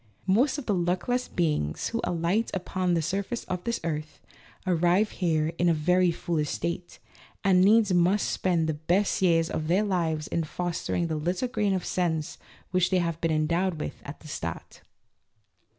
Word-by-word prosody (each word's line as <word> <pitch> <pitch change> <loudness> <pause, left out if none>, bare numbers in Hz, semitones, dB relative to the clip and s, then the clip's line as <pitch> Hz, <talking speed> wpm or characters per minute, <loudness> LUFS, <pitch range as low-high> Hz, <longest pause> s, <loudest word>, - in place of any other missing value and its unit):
Most 235 +10 +3
of 290 - -6
the 210 - +1
luckless 185 +8 0
beings 150 - -1
who 230 - -2
alight 180 +6 0
upon 185 -1 -1
the 165 - 0
surface 200 +8 -2
of 180 -1 -4
this 235 0 -1
earth 155 -2 -4 0.5
arrive 180 +3 +2
here 160 -3 0
in 175 0 +4
a 165 - +3
very 180 +4 +3
foolish 165 -3 -1
state, 175 +1 -4 0.5
and 190 -2 +5
needs 210 0 +5
must 180 +4 +3
spend 175 -3 +1
the 160 - 0
best 175 +8 0
years 165 -3 +3
of 155 - -3
their 185 +5 +3
lives 165 -6 0
in 170 - -1
fostering 175 +1 -2
the 160 -2 -2
little 175 +10 -1
grain 205 -5 0
of 185 - -3
sense 160 -4 -1 0.3
which 180 -1 +2
they 185 - +2
have 170 -2 -1
been 165 - +1
endowed 165 +3 0
with - - -5
at 145 - -9
the 155 - -12
start. 85 - -6
175 Hz, 175 wpm, -27 LUFS, 160-190 Hz, 0.5 s, and